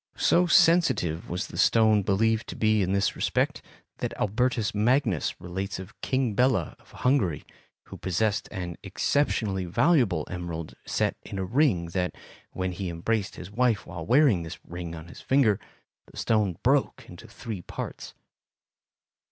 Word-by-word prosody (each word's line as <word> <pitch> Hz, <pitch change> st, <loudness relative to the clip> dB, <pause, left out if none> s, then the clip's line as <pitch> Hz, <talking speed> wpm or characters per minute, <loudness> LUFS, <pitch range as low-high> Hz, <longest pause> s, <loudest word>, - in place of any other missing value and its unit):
So 180 Hz, +1 st, +3 dB
sensitive 160 Hz, -, +3 dB
was 90 Hz, +3 st, -2 dB
the -, -, -8 dB
stone 110 Hz, -2 st, +4 dB
believed 110 Hz, +3 st, +1 dB
to -, -, -6 dB
be 110 Hz, -1 st, +2 dB
in 95 Hz, -1 st, 0 dB
this 100 Hz, 0 st, +1 dB
respect -, -, 0 dB, 0.4 s
that -, -, -3 dB
Albertus 115 Hz, +1 st, 0 dB
Magnus 110 Hz, -, +1 dB
relates 95 Hz, +2 st, -4 dB
of 95 Hz, +3 st, -11 dB
King 130 Hz, -4 st, 0 dB
Bela 125 Hz, -, +1 dB
of -, -, -24 dB
Hungary, 120 Hz, -, 0 dB, 0.4 s
who -, -, -11 dB
possessed 100 Hz, +3 st, -1 dB
an 90 Hz, -2 st, -5 dB
exceptionally 105 Hz, -10 st, 0 dB
valuable 100 Hz, -, +2 dB
emerald 85 Hz, -3 st, -5 dB
set -, -, 0 dB
in 100 Hz, -, -8 dB
a 95 Hz, -, -2 dB
ring, 110 Hz, -, +2 dB
that, 90 Hz, +1 st, -2 dB, 0.4 s
when 95 Hz, 0 st, -2 dB
he 90 Hz, +1 st, -4 dB
embraced 95 Hz, +5 st, -2 dB
his 90 Hz, +2 st, -9 dB
wife 115 Hz, -1 st, +1 dB
while 85 Hz, -1 st, -7 dB
wearing 125 Hz, -, +4 dB
this 80 Hz, 0 st, -7 dB
ring 85 Hz, -1 st, -6 dB
on 80 Hz, 0 st, -9 dB
his -, -, -12 dB
finger, 130 Hz, -7 st, +3 dB, 0.5 s
the -, -, -16 dB
stone 105 Hz, -6 st, +1 dB
broke -, -, +1 dB
into -, -, -12 dB
three 110 Hz, -6 st, -7 dB
parts. -, -, -7 dB
100 Hz, 150 wpm, -27 LUFS, 90-115 Hz, 0.5 s, stone